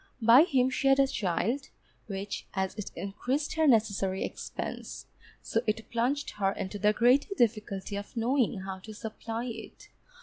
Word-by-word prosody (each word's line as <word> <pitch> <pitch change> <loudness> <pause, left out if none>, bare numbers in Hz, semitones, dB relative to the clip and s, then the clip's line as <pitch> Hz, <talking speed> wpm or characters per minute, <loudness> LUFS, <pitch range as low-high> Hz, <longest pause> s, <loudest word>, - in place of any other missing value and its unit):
By 240 +6 +7
him 260 -5 +2
she 275 - 0
had 270 0 +5
a 275 - +6
child, 225 +4 -1 0.4
which 200 -1 -5
as 190 -1 0
it 210 - -6
increased 255 +9 -2
her 315 -1 +2
necessary 200 -6 +2
expense, - - -6 0.4
so - - 0
it 215 0 -2
plunged 255 +5 0
her 195 -1 +2
into 195 +2 -5
the 210 +1 +4
greater 255 - +3
difficulty 210 - 0
of 205 +4 -8
knowing 235 -3 +1
how 190 0 -6
to 215 +3 -10
supply 225 +2 -5
it. 225 -2 -8
225 Hz, 160 wpm, -29 LUFS, 200-260 Hz, 0.4 s, By